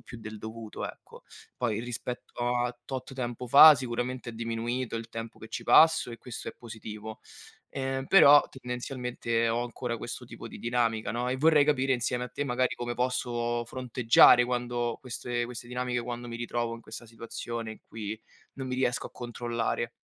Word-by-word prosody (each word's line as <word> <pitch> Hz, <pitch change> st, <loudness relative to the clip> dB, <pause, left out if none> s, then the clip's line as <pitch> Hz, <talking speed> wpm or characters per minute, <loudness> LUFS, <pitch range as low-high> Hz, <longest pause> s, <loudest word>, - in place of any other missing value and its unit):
più 120 Hz, -, -11 dB
del 110 Hz, -1 st, -8 dB
dovuto, 110 Hz, 0 st, -7 dB
ecco. -, -, -17 dB, 0.3 s
Poi 110 Hz, -4 st, -1 dB
rispetto 120 Hz, 0 st, -4 dB
a 120 Hz, 0 st, -1 dB
tot 135 Hz, 0 st, -5 dB
tempo 125 Hz, -1 st, -4 dB
fa 145 Hz, +5 st, +10 dB
sicuramente 125 Hz, -1 st, -3 dB
è -, -, -11 dB
diminuito 115 Hz, +1 st, -3 dB
il 115 Hz, 0 st, -6 dB
tempo 115 Hz, 0 st, -7 dB
che 110 Hz, -, -10 dB
ci -, -, -5 dB
passo 160 Hz, -5 st, +6 dB
e 115 Hz, -, -7 dB
questo 125 Hz, -2 st, -7 dB
è -, -, -8 dB
positivo. 110 Hz, -1 st, -8 dB, 0.5 s
Ehm, 135 Hz, 0 st, -3 dB
però 145 Hz, -6 st, +8 dB
tendenzialmente 125 Hz, -2 st, -2 dB
ho 120 Hz, +1 st, 0 dB
ancora 120 Hz, 0 st, -4 dB
questo -, -, -6 dB
tipo -, -, -9 dB
di -, -, -10 dB
dinamica, 115 Hz, -3 st, 0 dB
no, 120 Hz, +1 st, -1 dB
e 130 Hz, -, 0 dB
vorrei 155 Hz, +1 st, +5 dB
capire 135 Hz, -2 st, +2 dB
insieme 125 Hz, 0 st, -1 dB
a -, -, -7 dB
te 145 Hz, -, -4 dB
magari 125 Hz, -1 st, 0 dB
come 120 Hz, 0 st, -4 dB
posso 120 Hz, -1 st, -1 dB
fronteggiare 120 Hz, -1 st, +5 dB
quando 120 Hz, -1 st, -1 dB
queste 120 Hz, -1 st, -3 dB
queste 120 Hz, 0 st, -8 dB
dinamiche, 125 Hz, 0 st, -2 dB
quando 120 Hz, 0 st, -5 dB
mi 115 Hz, -, -5 dB
ritrovo 120 Hz, 0 st, -2 dB
in 115 Hz, -, -10 dB
questa 115 Hz, +1 st, -9 dB
situazione 115 Hz, 0 st, -6 dB
in -, -, -13 dB
cui 110 Hz, -1 st, -6 dB, 0.4 s
non 135 Hz, -1 st, -5 dB
mi 130 Hz, -, -2 dB
riesco 125 Hz, -2 st, 0 dB
a -, -, -29 dB
controllare. 120 Hz, -1 st, -3 dB
120 Hz, 175 wpm, -29 LUFS, 115-125 Hz, 0.5 s, fa